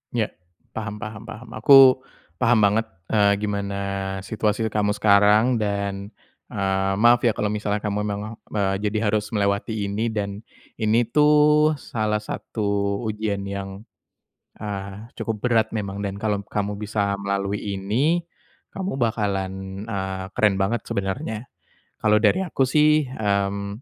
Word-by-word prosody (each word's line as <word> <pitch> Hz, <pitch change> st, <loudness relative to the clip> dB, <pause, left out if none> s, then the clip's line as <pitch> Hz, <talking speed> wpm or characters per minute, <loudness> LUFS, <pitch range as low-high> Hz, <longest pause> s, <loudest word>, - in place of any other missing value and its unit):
Ya. 110 Hz, -3 st, 0 dB, 0.4 s
Paham 105 Hz, -1 st, -5 dB
paham 110 Hz, +1 st, -7 dB
paham. 115 Hz, +1 st, -10 dB
Aku 130 Hz, +3 st, +8 dB, 0.4 s
paham 115 Hz, -1 st, +3 dB
banget, 105 Hz, +2 st, +3 dB, 0.2 s
eee, 105 Hz, -2 st, +4 dB
gimana 100 Hz, -1 st, -2 dB, 0.4 s
situasi 105 Hz, +2 st, -1 dB
kamu 105 Hz, -1 st, +1 dB
sekarang, 105 Hz, +4 st, +4 dB
dan, 100 Hz, -1 st, -3 dB, 0.4 s
eee, 95 Hz, -1 st, 0 dB
maaf 120 Hz, +1 st, +6 dB
ya 115 Hz, -, +4 dB
kalau 105 Hz, -, -1 dB
misalnya 105 Hz, 0 st, -2 dB
kamu 105 Hz, 0 st, -2 dB
memang 105 Hz, +2 st, -4 dB, 0.2 s
me 95 Hz, -2 st, +1 dB
jadi 105 Hz, +1 st, 0 dB
harus 105 Hz, 0 st, 0 dB
melewati 100 Hz, 0 st, 0 dB
ini. 110 Hz, +3 st, -1 dB
Dan 100 Hz, -2 st, -3 dB, 0.4 s
ini 110 Hz, +1 st, +2 dB
tuh 150 Hz, +2 st, +5 dB
salah 105 Hz, -1 st, -1 dB
satu 100 Hz, -2 st, -2 dB
ujian 105 Hz, -2 st, -2 dB
yang, 100 Hz, 0 st, -6 dB, 0.8 s
eee, 100 Hz, +2 st, -6 dB
cukup 115 Hz, -2 st, -2 dB
berat 115 Hz, -3 st, +3 dB
memang 100 Hz, -1 st, -4 dB
dan 100 Hz, -1 st, -3 dB
kalom 105 Hz, -1 st, -1 dB
kamu 105 Hz, 0 st, -3 dB
bisa 105 Hz, -1 st, -1 dB
melalui 100 Hz, 0 st, -2 dB, 0.2 s
ini, 135 Hz, -, +1 dB, 0.5 s
kamu 190 Hz, -6 st, -3 dB
bakalan, 95 Hz, -4 st, -2 dB
eee, 95 Hz, -3 st, -4 dB
keren 105 Hz, -3 st, +2 dB
banget 100 Hz, +4 st, 0 dB
sebenarnya. 110 Hz, +2 st, -3 dB, 0.5 s
Kalo 105 Hz, -1 st, +3 dB
dari 185 Hz, -, +3 dB
aku 135 Hz, -7 st, 0 dB
sih, 150 Hz, +2 st, +4 dB
hmm, 100 Hz, -2 st, -2 dB
105 Hz, 135 wpm, -23 LUFS, 100-110 Hz, 0.8 s, Aku